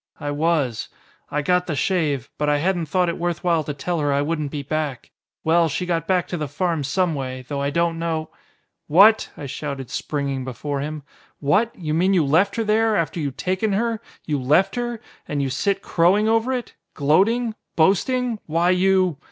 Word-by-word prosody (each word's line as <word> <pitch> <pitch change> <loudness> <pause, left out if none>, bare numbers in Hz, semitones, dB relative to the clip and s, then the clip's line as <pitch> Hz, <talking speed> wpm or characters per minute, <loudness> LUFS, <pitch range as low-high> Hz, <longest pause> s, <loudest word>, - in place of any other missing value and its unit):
I 145 -2 -3
was. 145 -6 0 0.4
I 150 0 -1
got 180 +3 +2
the 160 - -1
shave. 150 - 0
But 150 0 +1
I 145 - +3
hadn't 175 +1 0
thought 180 +3 +1
it 170 - -2
worth 175 -1 -2
while 170 -3 +2
to 150 - -4
tell 170 +4 -2
her 145 -1 +1
I 140 +1 +2
wouldn't 155 -1 -2
be 145 0 -5
back. 145 -3 -3 0.3
Well, 165 0 +3
she 180 +5 -2
got 165 -2 -1
back 185 -2 +1
to 175 - -2
the 150 -2 -3
farm 160 +2 -1
some 170 +5 +1
way, 130 -2 -5
though 140 0 -3
I 140 - 0
don't 170 +2 0
know 160 -1 -2 0.3
" - - -50
"What!" 200 +8 +6
I 145 - -6
shouted, 140 -1 -5
springing 140 -3 -2
before 135 +3 -4
him. 150 +1 -5 0.4
"What! 205 +11 +2
You 155 -4 -3
mean 185 +4 +3
you 165 -5 +3
left 180 +8 +3
her 230 - 0
there! 220 +1 +2
After 170 -1 -1
you'd 140 -3 -3
taken 190 +3 0
her, 230 +2 0 0.2
you 145 -4 -1
left 175 +10 +3
her! 240 -1 -3 0.3
And 145 - -2
here 140 - +1
you - - -2
sit 195 +8 0
crowing 185 +6 +3
over 225 +3 +2
it! 250 -2 -3 0.2
Gloating! 215 - +2 0.2
Boasting! 225 +7 +2
Why 170 +3 +2
you 185 -3 +2
165 Hz, 200 wpm, -22 LUFS, 145-190 Hz, 0.4 s, What